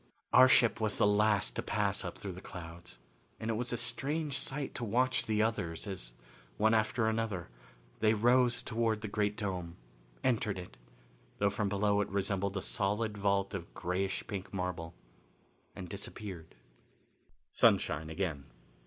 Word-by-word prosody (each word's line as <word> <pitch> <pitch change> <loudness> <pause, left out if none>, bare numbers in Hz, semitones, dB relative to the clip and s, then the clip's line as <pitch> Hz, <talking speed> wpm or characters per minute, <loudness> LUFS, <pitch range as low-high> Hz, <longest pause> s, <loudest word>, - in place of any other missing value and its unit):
Our 130 0 +9
ship 120 -3 +4
was 110 -1 +2
the - - +4
last 105 - +3
to - - -1
pass - - 0
up - - -5
through 100 - -5
the 90 +1 -9
clouds, 85 -6 -9 0.4
and 110 +1 -2
it - - +1
was 120 +2 0
a 120 - 0
strange 140 +5 0
sight 140 0 -1
to 120 - -4
watch 125 +4 +2
the 110 -1 +2
others 85 -8 -2
as - - -5 0.4
one 110 +1 +4
after 110 +1 +2
another 110 - -1 0.5
they 110 0 +4
rose 120 +2 +3
toward 115 -2 0
the 110 - -3
great 105 0 0
dome, 90 -6 -3 0.5
entered 110 -5 +1
it, 90 -1 -8 0.6
though 100 0 +2
from 100 0 -1
below 100 +1 +2
it 100 - -2
resembled 100 0 -1
a 95 - -3
solid 105 +2 0
vault 100 -1 +1
of 85 -4 -5
grayish 95 +2 -2
pink 100 -2 -5
marble, 90 -3 -4 0.8
and 90 - -7
disappeared. 95 -2 -7 1.0
Sunshine 80 +2 +3
Again. 80 -5 -3
105 Hz, 155 wpm, -32 LUFS, 95-110 Hz, 1.0 s, Our